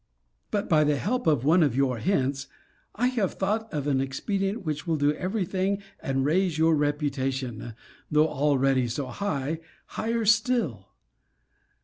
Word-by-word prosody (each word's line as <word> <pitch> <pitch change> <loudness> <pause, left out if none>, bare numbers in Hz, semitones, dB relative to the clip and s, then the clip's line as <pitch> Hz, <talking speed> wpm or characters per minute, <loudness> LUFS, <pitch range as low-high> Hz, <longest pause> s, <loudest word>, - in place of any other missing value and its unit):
But, 205 -1 -1
by 155 -2 +4
the 150 0 +2
help 245 - -1
of 145 -5 +2
one 170 +4 +5
of 140 -7 +2
your 130 -3 +1
hints, 135 - 0 0.5
I 235 - +1
have 225 -7 -1
thought 215 +3 -1
of 145 -3 -3
an 135 -2 +1
expedient 195 - -2
which 150 +1 -3
will 160 -1 +1
do 145 +1 +2
ever 190 +6 -2
thing, 195 +2 -1 0.2
and 135 0 -1
raise 175 +2 +1
your 160 0 +4
reputation, 135 -6 -2 0.3
though 150 +1 +4
already 135 -3 +2
so 125 +4 -3
high, 160 -5 -2 0.3
higher 230 0 -2
still. 215 - +2
150 Hz, 150 wpm, -26 LUFS, 135-195 Hz, 0.5 s, one